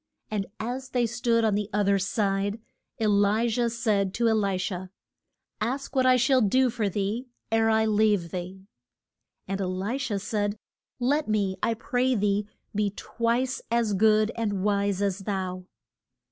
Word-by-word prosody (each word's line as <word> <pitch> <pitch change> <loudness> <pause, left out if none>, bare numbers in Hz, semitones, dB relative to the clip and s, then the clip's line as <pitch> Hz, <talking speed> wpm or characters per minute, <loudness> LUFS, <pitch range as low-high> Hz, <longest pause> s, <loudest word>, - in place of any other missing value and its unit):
And 205 -2 -1
as 255 +4 -4
they 245 -2 +1
stood 235 0 +1
on 215 - +2
the 205 0 -1
oth 205 -1 +2
er 200 0 +3
side, 200 +1 0 0.4
E 225 - +1
li 205 +2 +3
jah 235 +1 +1
said 215 -5 0
to 235 -1 +2
E - - +4
li 200 -3 +1
sha, 185 0 -3 0.7
Ask 265 +5 -3
what 260 -1 +4
I 255 - +6
shall 255 +1 +3
do 250 +4 +3
for 220 -4 -1
thee, 205 +6 -2 0.2
ere 225 0 +3
I 220 0 +3
leave 210 -5 +2
thee. 185 +1 -6 0.8
And 195 +1 -2
E - - 0
li 190 +8 -2
sha 240 -7 -1
said, 205 +1 -2 0.4
Let 285 +5 +1
me, 205 -3 0
I 230 - +1
pray 250 +3 0
thee, 205 -1 +1 0.3
be 210 0 +1
twice 240 +3 -1
as 230 -2 +1
good 215 +2 +4
and 205 -5 -1
wise 200 -1 +1
as 200 -1 0
thou. 185 -2 -3
215 Hz, 170 wpm, -27 LUFS, 200-235 Hz, 0.8 s, I